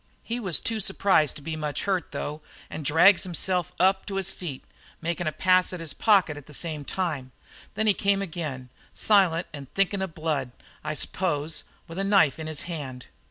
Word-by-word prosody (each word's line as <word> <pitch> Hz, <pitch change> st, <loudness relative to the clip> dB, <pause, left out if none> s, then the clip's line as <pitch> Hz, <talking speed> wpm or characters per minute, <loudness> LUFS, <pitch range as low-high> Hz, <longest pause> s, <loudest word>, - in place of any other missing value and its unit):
"He 235 Hz, +1 st, -3 dB
was 185 Hz, -, +1 dB
too 225 Hz, -1 st, -1 dB
surprised 190 Hz, -7 st, +3 dB
to 145 Hz, -, -10 dB
be 160 Hz, +1 st, -3 dB
much 150 Hz, -2 st, -3 dB
hurt, 190 Hz, -4 st, -1 dB
though, 150 Hz, +1 st, -4 dB, 0.3 s
and 155 Hz, -, -5 dB
drags 170 Hz, +7 st, +6 dB
himself 180 Hz, 0 st, 0 dB
up 190 Hz, +1 st, +3 dB
to 200 Hz, -, -4 dB
his 195 Hz, -2 st, +1 dB
feet, 155 Hz, -8 st, -7 dB, 0.4 s
makin' 170 Hz, 0 st, -2 dB
a -, -, +1 dB
pass 185 Hz, +4 st, +3 dB
at 180 Hz, -, -5 dB
his 165 Hz, -3 st, -3 dB
pocket 195 Hz, -8 st, +3 dB
at 145 Hz, -, -11 dB
the 150 Hz, -, -7 dB
same 155 Hz, -2 st, -3 dB
time. 145 Hz, -6 st, -3 dB, 0.4 s
Then 220 Hz, -, 0 dB
he 210 Hz, -, +5 dB
came 200 Hz, 0 st, +1 dB
again, 155 Hz, -8 st, -5 dB, 0.3 s
silent 185 Hz, -5 st, +4 dB
and 140 Hz, -2 st, -9 dB
thinkin' 195 Hz, 0 st, +1 dB
of 190 Hz, -4 st, -4 dB
blood, 150 Hz, -6 st, -2 dB, 0.3 s
I 155 Hz, 0 st, -3 dB
s'pose, 155 Hz, -2 st, 0 dB, 0.2 s
with 165 Hz, +2 st, -6 dB
a -, -, +1 dB
knife 195 Hz, -8 st, +4 dB
in 160 Hz, -, -5 dB
his 155 Hz, -2 st, -2 dB
hand. 140 Hz, -7 st, -6 dB
165 Hz, 195 wpm, -26 LUFS, 150-190 Hz, 0.4 s, drags